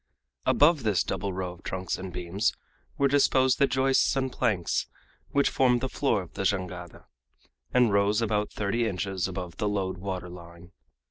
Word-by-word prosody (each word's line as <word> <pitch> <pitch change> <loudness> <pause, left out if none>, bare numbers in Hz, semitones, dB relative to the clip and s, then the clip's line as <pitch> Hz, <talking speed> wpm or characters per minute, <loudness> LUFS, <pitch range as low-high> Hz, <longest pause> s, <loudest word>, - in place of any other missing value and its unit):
Above 150 0 +5
this 105 -5 +1
double 100 - -3
row 90 -1 -3
of 90 - -17
trunks 95 -1 -3
and 95 0 -7
beams 90 +5 -1 0.4
were 140 - +3
disposed 130 -2 +3
the 140 - +5
joists 135 +1 +2
and 130 -1 -1
planks 105 -9 0 0.4
which 140 0 +2
formed 125 -2 +3
the 130 - -2
floor 130 -7 0
of 85 - -15
the - - -4
jangada, 90 -3 -3 0.7
and 125 -4 +3
rose 100 +1 +3
about 105 -2 0
thirty 110 +3 -1
inches 95 -2 -2
above 90 -2 -6
the 105 - 0
load 95 -3 -2
water 95 -1 -4
line. 85 0 -12
100 Hz, 165 wpm, -27 LUFS, 90-125 Hz, 0.7 s, Above